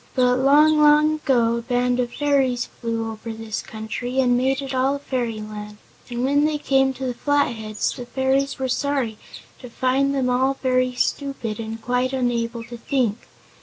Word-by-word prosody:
But 250 -1 +3
long, 300 +3 +5
long 300 +1 +5
ago 240 -6 +2
a - - -3
band 245 +1 0
of 245 -1 -1
fairies 270 -4 +1
flew 230 -1 -4
over 220 +1 -7
this 225 -1 -5
country 225 +4 -4
and 250 -2 +3
made 260 +2 +1
it 270 0 -5
all 260 +2 +2
a - - -3
fairyland, 215 -6 -4 0.3
and 240 0 -3
when 285 +2 +3
they 305 -1 0
came 270 -2 +2
to 265 - -5
the 250 - -1
Flatheads 235 -6 -1
the 245 - -8
fairies 265 +2 0
were 265 -1 -2
sorry 260 -4 -1 0.4
to 250 - -10
find 265 +3 +1
them 260 -2 +1
all 260 +2 +2
very 255 -1 0
stupid 245 -5 -2
and 225 0 -5
quite 250 +1 0
unable 240 -2 -1
to 240 +1 -9
think. 235 -3 -1
250 Hz, 175 wpm, -22 LUFS, 235-270 Hz, 0.4 s, long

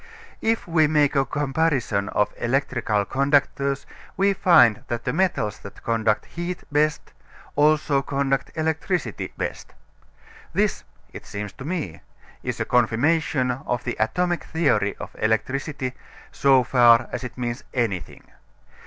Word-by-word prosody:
If 225 -2 0
we 160 -2 +3
make 150 -1 +2
a 135 -1 +3
comparison 140 -8 0
of 105 - 0
electric 130 0 -1 0.2
conductors 140 0 +1 0.3
we 200 +1 +3
find 130 - +5
that 120 -1 -3
the - - -1
metals 150 - 0
that 100 - -12
conduct 110 -2 +1
heat 175 +1 -5
best 150 +1 0 0.4
also 150 -1 +3
conduct 135 -1 -1
electricity 160 - -2
best. - - -5 0.8
This, - - 0 0.3
it - - -10
seems 105 0 -6
to 130 - -10
me, 155 - -4 0.4
is - - -4
a - - 0
confirmation 125 +3 +2
of 125 -1 -3
the - - -3
atomic 175 +11 0
theory 120 -11 +1
of - - -8
electricity 130 +4 -1 0.4
so 135 -2 +4
far 120 -1 +5
as - - -4
it 125 - -7
means 120 -1 -3
anything. 110 -8 -2
135 Hz, 130 wpm, -23 LUFS, 120-155 Hz, 0.8 s, find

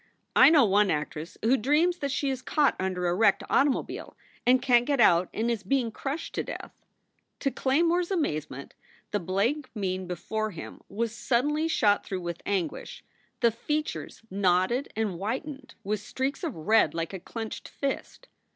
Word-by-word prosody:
"I 265 - +9
know 305 -6 +6
one 205 0 +3
actress 150 +1 -3
who 235 +4 +4
dreams 300 +9 +2
that 280 - -2
she 275 0 0
is 260 -1 -4
caught 290 +2 +2
under 185 -1 -1
a 175 - +2
wrecked 205 +1 +3
automobile 275 -1 0 0.3
and 255 +1 +6
can 245 -2 +4
t - - -8
get 280 -1 0
out 180 -5 +5
and 230 +2 -1
is 230 -4 -2
being 235 +3 0
crushed 275 +7 -5
to - - -1
death." - - -7 0.7
To 275 - +1
Claymore 330 +8 +2
s 355 - -2
amazement 155 - -2 0.4
the 205 - 0
blank 215 - -1
mien 185 -3 -2
before 215 +5 -3
him 170 -6 -9
was 225 +2 -2
suddenly 290 +7 +1
shot 205 -10 +3
through 190 -2 -4
with 170 -1 -5
anguish, 195 -4 -3 0.4
the 235 -2 +5
features 300 +2 -4
knotted 190 +7 +1
and 220 -2 0
whitened 265 - -5
with 210 +1 -1
streaks 265 - -3
of 315 -8 -3
red 165 -1 +3
like 165 +2 -3
a 190 - -4
clenched 225 +4 -6
fist. 280 - -4
225 Hz, 170 wpm, -27 LUFS, 190-275 Hz, 0.7 s, I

